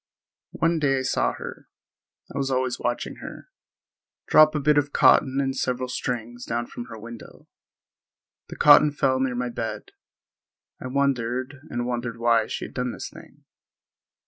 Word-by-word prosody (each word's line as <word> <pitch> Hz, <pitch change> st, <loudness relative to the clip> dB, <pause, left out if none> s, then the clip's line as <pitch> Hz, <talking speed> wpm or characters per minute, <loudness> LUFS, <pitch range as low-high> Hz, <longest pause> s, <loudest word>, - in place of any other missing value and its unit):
One 165 Hz, 0 st, +1 dB
day 135 Hz, -3 st, +2 dB
I -, -, 0 dB
saw 130 Hz, -, +1 dB
her—I -, -, -13 dB
was 135 Hz, -1 st, -1 dB
always 130 Hz, -1 st, -1 dB
watching 120 Hz, 0 st, -3 dB
her—drop 155 Hz, 0 st, -1 dB
a -, -, +1 dB
bit 150 Hz, +1 st, +4 dB
of 145 Hz, 0 st, -3 dB
cotton 135 Hz, 0 st, +4 dB
and 135 Hz, -1 st, -1 dB
several 125 Hz, -1 st, -2 dB
strings 120 Hz, -1 st, -4 dB
down 120 Hz, +1 st, -2 dB
from 120 Hz, -, -8 dB
her 115 Hz, -, -10 dB
window. 115 Hz, +1 st, -11 dB, 1.0 s
The -, -, -7 dB
cotton 150 Hz, 0 st, +7 dB
fell 130 Hz, -2 st, +1 dB
near 130 Hz, -2 st, 0 dB
my 125 Hz, 0 st, -2 dB
bed. 115 Hz, -1 st, -5 dB, 0.9 s
I -, -, -4 dB
wondered 130 Hz, 0 st, -1 dB
and 120 Hz, 0 st, -3 dB
wondered 120 Hz, -1 st, -3 dB
why 115 Hz, -1 st, +2 dB
she -, -, -4 dB
had -, -, -11 dB
done 125 Hz, -1 st, -2 dB
this -, -, -7 dB
thing. -, -, -16 dB
125 Hz, 150 wpm, -25 LUFS, 120-140 Hz, 1.0 s, cotton